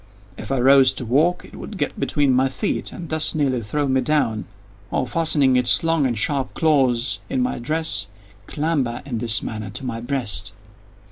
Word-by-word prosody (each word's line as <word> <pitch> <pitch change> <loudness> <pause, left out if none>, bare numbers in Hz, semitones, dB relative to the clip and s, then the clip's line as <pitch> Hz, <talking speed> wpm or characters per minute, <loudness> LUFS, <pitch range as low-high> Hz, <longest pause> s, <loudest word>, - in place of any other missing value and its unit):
If - - -8
I 135 - +1
arose 135 +1 +5
to 125 - -5
walk 155 +10 +1
it - - -14
would 210 - -8
get - - -3
between 140 -3 +1
my 130 +1 +2
feet 200 +10 -3
and 170 - -8
thus 160 +1 +1
nearly 135 -5 0
throw 145 +7 -2
me 130 0 +2
down, 120 -8 0 0.4
or, - - -1
fastening 145 -2 +2
its 125 +4 +4
long 165 -4 +2
and 120 -3 -2
sharp 135 +4 -1
claws 130 -6 +2
in 265 - -1
my 250 - -1
dress, 155 -4 -1 0.4
clamber, 145 -6 -1
in 120 -5 -4
this 110 -2 -1
manner, 110 -2 -5
to 120 +7 -7
my 115 -2 -4
breast. 120 -8 -2
135 Hz, 185 wpm, -21 LUFS, 120-155 Hz, 0.4 s, arose